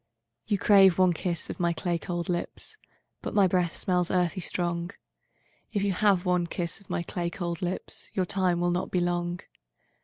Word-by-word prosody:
'—V'You 210 Hz, -2 st, +2 dB
crave 195 Hz, -3 st, +6 dB
one 185 Hz, -1 st, +5 dB
kiss 170 Hz, 0 st, -3 dB
of -, -, -8 dB
my 170 Hz, -1 st, +2 dB
clay 175 Hz, 0 st, -1 dB
cold 175 Hz, -1 st, -3 dB
lips; 175 Hz, -, -3 dB, 0.5 s
But -, -, -5 dB
my 200 Hz, -2 st, +6 dB
breath 180 Hz, -2 st, +1 dB
smells 180 Hz, -1 st, +1 dB
earthy 180 Hz, 0 st, +1 dB
strong; 175 Hz, 0 st, -1 dB, 0.8 s
If 200 Hz, -3 st, 0 dB
you 200 Hz, -1 st, +1 dB
have 195 Hz, -1 st, +3 dB
one 180 Hz, -1 st, +2 dB
kiss 170 Hz, +2 st, -4 dB
of 200 Hz, -, -22 dB
my 170 Hz, -, -1 dB
clay 175 Hz, 0 st, -3 dB
cold 170 Hz, -2 st, -4 dB
lips, 180 Hz, +1 st, -3 dB
Your 185 Hz, -, +1 dB
time 185 Hz, -2 st, +1 dB
will 175 Hz, 0 st, +2 dB
not 180 Hz, +1 st, -1 dB
be -, -, -1 dB
long. 175 Hz, 0 st, -1 dB
180 Hz, 185 wpm, -28 LUFS, 175-185 Hz, 0.8 s, crave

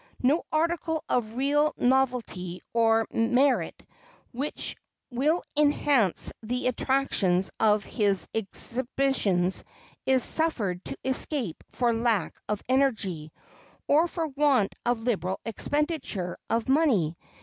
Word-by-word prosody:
No 290 Hz, +7 st, +2 dB
article 320 Hz, 0 st, 0 dB
of 225 Hz, -2 st, -1 dB
real 290 Hz, +3 st, +2 dB
novelty 245 Hz, -9 st, 0 dB
or 225 Hz, -1 st, +3 dB
merit 250 Hz, +4 st, +1 dB, 0.5 s
which 275 Hz, +5 st, -3 dB, 0.4 s
will 295 Hz, +8 st, +1 dB
enhance 285 Hz, -, +2 dB
the 245 Hz, +3 st, -3 dB
attractions 245 Hz, -8 st, +1 dB
of 210 Hz, -2 st, +3 dB
his 200 Hz, -6 st, +1 dB
exhibitions 225 Hz, -3 st, 0 dB, 0.4 s
is 260 Hz, -1 st, +3 dB
suffered 210 Hz, -, 0 dB
to -, -, -4 dB
escape 260 Hz, -, -1 dB
for 240 Hz, -2 st, +1 dB
lack 225 Hz, -5 st, 0 dB, 0.2 s
of 210 Hz, -1 st, -2 dB
energy, 220 Hz, -, 0 dB, 0.6 s
or 315 Hz, +4 st, +4 dB
for 330 Hz, -1 st, -3 dB
want 275 Hz, -7 st, +2 dB
of 240 Hz, -2 st, +1 dB
liberal 190 Hz, -6 st, -1 dB
expenditure 265 Hz, -, -2 dB
of 230 Hz, 0 st, 0 dB
money. 260 Hz, -, +2 dB
245 Hz, 105 wpm, -27 LUFS, 210-280 Hz, 0.6 s, or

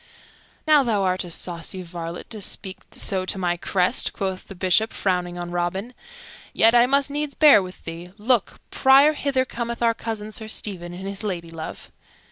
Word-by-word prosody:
"Now, 305 Hz, -2 st, +6 dB
thou 220 Hz, -6 st, +1 dB
art 185 Hz, -1 st, +1 dB
a -, -, -8 dB
saucy 175 Hz, +2 st, -4 dB
varlet 170 Hz, 0 st, -7 dB
to 215 Hz, -2 st, -6 dB
speak 190 Hz, 0 st, -5 dB
so 190 Hz, -2 st, -1 dB
to -, -, +1 dB
my 175 Hz, -2 st, 0 dB
crest," 180 Hz, +5 st, +1 dB
quoth 190 Hz, -2 st, -4 dB
the 195 Hz, -, -9 dB
Bishop, 185 Hz, +4 st, +2 dB
frowning 180 Hz, -2 st, -1 dB
on 175 Hz, 0 st, -5 dB
Robin. 175 Hz, +7 st, -2 dB, 0.6 s
"Yet, 225 Hz, +1 st, +5 dB
I 240 Hz, 0 st, +6 dB
must 280 Hz, +1 st, +2 dB
needs 295 Hz, 0 st, -3 dB
bear 295 Hz, -9 st, +7 dB
with 185 Hz, 0 st, -10 dB
thee. 170 Hz, +2 st, -7 dB
Look, 230 Hz, 0 st, 0 dB
Prior, 275 Hz, +3 st, +6 dB
hither 275 Hz, -3 st, 0 dB
cometh 235 Hz, -1 st, -4 dB
our 230 Hz, -1 st, +4 dB
cousin 220 Hz, -2 st, -5 dB
Sir 220 Hz, 0 st, -6 dB
Stephen, 185 Hz, -5 st, -4 dB
and 185 Hz, +2 st, -7 dB
his 195 Hz, 0 st, -3 dB
ladylove." 170 Hz, -5 st, -6 dB
195 Hz, 175 wpm, -23 LUFS, 175-235 Hz, 0.6 s, bear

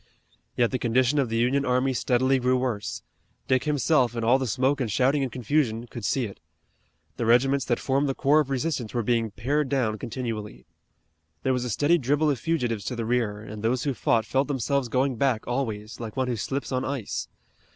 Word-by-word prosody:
Yet 120 Hz, -2 st, +3 dB
the 130 Hz, -, -1 dB
condition 130 Hz, +4 st, +2 dB
of 130 Hz, -4 st, +1 dB
the 115 Hz, -, -1 dB
Union 130 Hz, +4 st, +2 dB
army 130 Hz, +1 st, +1 dB
steadily 130 Hz, +2 st, +2 dB
grew 125 Hz, +1 st, +2 dB
worse. 125 Hz, -5 st, -3 dB, 0.4 s
Dick 130 Hz, 0 st, +2 dB
himself, 145 Hz, -4 st, +2 dB
in 115 Hz, -, -2 dB
all 125 Hz, +4 st, +4 dB
the 130 Hz, -, -2 dB
smoke 130 Hz, +5 st, +1 dB
and 115 Hz, -4 st, -1 dB
shouting 135 Hz, +5 st, +2 dB
and 130 Hz, -3 st, -2 dB
confusion, 120 Hz, -2 st, 0 dB
could 120 Hz, -1 st, -9 dB
see 125 Hz, +6 st, 0 dB
it. 100 Hz, -, -9 dB, 0.8 s
The 115 Hz, -, -1 dB
regiments 135 Hz, +3 st, +3 dB
that 120 Hz, -1 st, +1 dB
formed 140 Hz, +1 st, 0 dB
the 135 Hz, -, -1 dB
core 145 Hz, +3 st, +4 dB
of 145 Hz, -3 st, 0 dB
resistance 135 Hz, -4 st, -2 dB
were 120 Hz, -, +1 dB
being 115 Hz, 0 st, +1 dB
pared 135 Hz, +8 st, -1 dB
down 120 Hz, -6 st, 0 dB
continually. 110 Hz, -, -5 dB, 0.8 s
There 130 Hz, -, +2 dB
was 125 Hz, -1 st, -1 dB
a -, -, -3 dB
steady 145 Hz, +9 st, +3 dB
dribble 145 Hz, +3 st, +2 dB
of 135 Hz, -, -2 dB
fugitives 120 Hz, -11 st, -1 dB
to 125 Hz, -, -3 dB
the 115 Hz, -1 st, -3 dB
rear, 110 Hz, -3 st, 0 dB
and 105 Hz, 0 st, -8 dB
those 115 Hz, +2 st, 0 dB
who 140 Hz, -, 0 dB
fought 115 Hz, -2 st, +1 dB
felt 135 Hz, +4 st, +1 dB
themselves 140 Hz, -1 st, 0 dB
going 130 Hz, +1 st, +1 dB
back 125 Hz, -3 st, +1 dB
always, 115 Hz, -4 st, -3 dB
like 115 Hz, -1 st, -7 dB
one 130 Hz, -1 st, +1 dB
who 120 Hz, -, 0 dB
slips 135 Hz, +7 st, -3 dB
on 130 Hz, 0 st, 0 dB
ice. 135 Hz, -6 st, -3 dB
125 Hz, 205 wpm, -26 LUFS, 115-135 Hz, 0.8 s, all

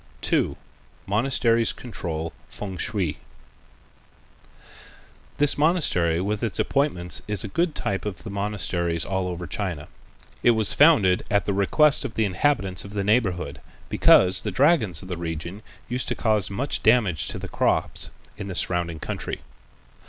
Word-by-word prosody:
2. -, -, +1 dB, 0.5 s
Monasteries 115 Hz, +1 st, +2 dB
Control 85 Hz, -9 st, -5 dB, 0.2 s
Fêng 95 Hz, -3 st, -6 dB
shui 95 Hz, -8 st, -2 dB, 2.2 s
This 145 Hz, 0 st, +3 dB
monastery 140 Hz, -, +2 dB
with 105 Hz, +3 st, -2 dB
its 115 Hz, -, -2 dB
appointments 90 Hz, -11 st, +1 dB
is 105 Hz, -2 st, +1 dB
a -, -, -4 dB
good 165 Hz, -, -1 dB
type 95 Hz, -1 st, -2 dB
of 100 Hz, -4 st, -6 dB
the 110 Hz, -, -7 dB
monasteries 95 Hz, -5 st, -1 dB
all 95 Hz, -1 st, -2 dB
over 90 Hz, 0 st, -5 dB
China. 85 Hz, -2 st, -4 dB, 0.5 s
It 120 Hz, -2 st, +4 dB
was 110 Hz, -2 st, +4 dB
founded 110 Hz, -, +5 dB
at 100 Hz, 0 st, +1 dB
the 100 Hz, -, 0 dB
request 140 Hz, +10 st, +3 dB
of 110 Hz, -, -6 dB
the 110 Hz, -, +2 dB
inhabitants 95 Hz, -3 st, 0 dB
of 100 Hz, -, -10 dB
the 100 Hz, -1 st, -1 dB
neighborhood, 100 Hz, -4 st, 0 dB, 0.3 s
because 90 Hz, 0 st, +5 dB
the -, -, -3 dB
dragons 135 Hz, -, +2 dB
of -, -, -9 dB
the 90 Hz, -2 st, -4 dB
region 85 Hz, +4 st, -5 dB, 0.3 s
used 125 Hz, +1 st, -2 dB
to -, -, -1 dB
cause 110 Hz, -4 st, +1 dB
much 125 Hz, +9 st, -3 dB
damage 110 Hz, -, +3 dB
to -, -, -4 dB
the -, -, -6 dB
crops -, -, 0 dB, 0.3 s
in 100 Hz, -, -6 dB
the 95 Hz, -, -5 dB
surrounding 85 Hz, -3 st, -1 dB
country. -, -, -5 dB
100 Hz, 150 wpm, -24 LUFS, 90-115 Hz, 2.2 s, founded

